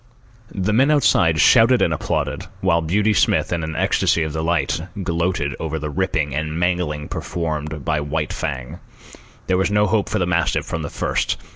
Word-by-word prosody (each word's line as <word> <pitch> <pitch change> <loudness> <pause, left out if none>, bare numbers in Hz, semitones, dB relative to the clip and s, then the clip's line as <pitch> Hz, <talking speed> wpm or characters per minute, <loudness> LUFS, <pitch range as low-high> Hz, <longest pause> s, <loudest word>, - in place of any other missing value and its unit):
The 100 +2 -1
men 130 +6 +4
outside 85 - +3
shouted 120 +7 +6
and 80 - +2
applauded, 75 - -2
while 85 -3 +2
Beauty 105 +7 +1
Smith, 90 -1 +2
in 85 -2 -2
an 80 0 -4
ecstasy 80 - +2
of 80 -1 -4
delight, 80 -1 0 0.2
gloated 85 -4 -1
over 80 0 -3
the 75 -1 -4
ripping 80 -5 -1
and 80 +2 -3
mangling 90 -4 -1
performed 75 -3 -4
by 75 -1 +1
White 75 0 -2
Fang. 65 -5 -5 0.7
There 95 - +1
was 95 - +1
no 105 0 +3
hope 105 +1 0
for - - -1
the 90 - +1
mastiff 85 -1 0
from 80 - -4
the 70 - -4
first. - - -1
80 Hz, 175 wpm, -21 LUFS, 75-95 Hz, 0.7 s, shouted